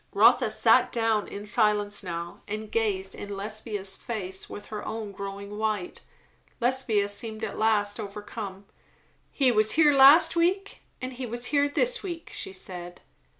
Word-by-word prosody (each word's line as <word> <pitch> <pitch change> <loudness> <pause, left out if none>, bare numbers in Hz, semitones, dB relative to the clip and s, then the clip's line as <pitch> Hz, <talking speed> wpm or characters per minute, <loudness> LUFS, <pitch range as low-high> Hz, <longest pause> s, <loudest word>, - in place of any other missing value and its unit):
Rotha - - +5
sat - - +4
down, 225 -3 +1
in 205 +1 -7
silence 210 -2 +1
now, 170 -2 -6
and 215 +1 -5
gazed 195 -4 -1
in 200 -1 -7
Lesbia's 205 -1 -4
face 190 -5 -5
with 205 - -8
her 210 - -4
own 220 -2 -5
growing 200 +1 -7
white. 215 -4 -2 0.6
Lesbia 240 -5 +2
seemed 220 +2 -4
at 215 - -3
last 215 -1 +2
overcome. 205 -1 -7 0.7
"He 265 -3 +3
was 215 -1 +2
here 300 -2 +5
last 275 +6 +8
week, 370 +4 0 0.2
and 255 0 -5
he 250 0 -5
was 240 +2 -1
here 285 0 +3
this 485 +9 +1
week," 345 -4 -7
she - - -5
said. 175 -2 -7
215 Hz, 150 wpm, -27 LUFS, 200-245 Hz, 0.7 s, last